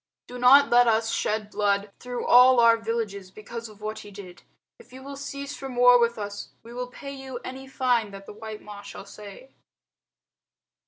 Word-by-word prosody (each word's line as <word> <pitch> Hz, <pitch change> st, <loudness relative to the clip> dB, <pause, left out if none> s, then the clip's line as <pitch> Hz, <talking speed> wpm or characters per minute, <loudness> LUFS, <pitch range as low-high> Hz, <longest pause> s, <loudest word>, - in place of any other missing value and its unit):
Do 250 Hz, 0 st, -9 dB
not 275 Hz, +3 st, +6 dB
let 245 Hz, 0 st, +6 dB
us 225 Hz, 0 st, +1 dB
shed 210 Hz, -1 st, -2 dB
blood 200 Hz, 0 st, 0 dB
through 245 Hz, -1 st, -5 dB
all 250 Hz, 0 st, +7 dB
our 230 Hz, -1 st, +6 dB
villages 225 Hz, -4 st, -4 dB
because 230 Hz, +3 st, -9 dB
of 210 Hz, -1 st, -17 dB
what 215 Hz, +1 st, -5 dB
he 205 Hz, -, -11 dB
did. 190 Hz, -3 st, -12 dB, 0.4 s
If 245 Hz, -, -18 dB
you 260 Hz, +1 st, -12 dB
will 280 Hz, +1 st, -8 dB
cease 280 Hz, 0 st, -7 dB
from 265 Hz, -2 st, -8 dB
war 245 Hz, 0 st, +6 dB
with 235 Hz, 0 st, +1 dB
us, 205 Hz, -1 st, -6 dB
we 230 Hz, +1 st, -12 dB
will 250 Hz, 0 st, -4 dB
pay 275 Hz, +2 st, -9 dB
to 270 Hz, -, -10 dB
you 265 Hz, -2 st, -7 dB
any 265 Hz, +1 st, -8 dB
fine 250 Hz, -5 st, 0 dB
that 195 Hz, 0 st, -11 dB
the -, -, -10 dB
white 215 Hz, 0 st, -9 dB
Ma 205 Hz, -1 st, -10 dB
shall 200 Hz, -, -10 dB
say." 205 Hz, +6 st, -12 dB
230 Hz, 200 wpm, -25 LUFS, 210-250 Hz, 0.4 s, all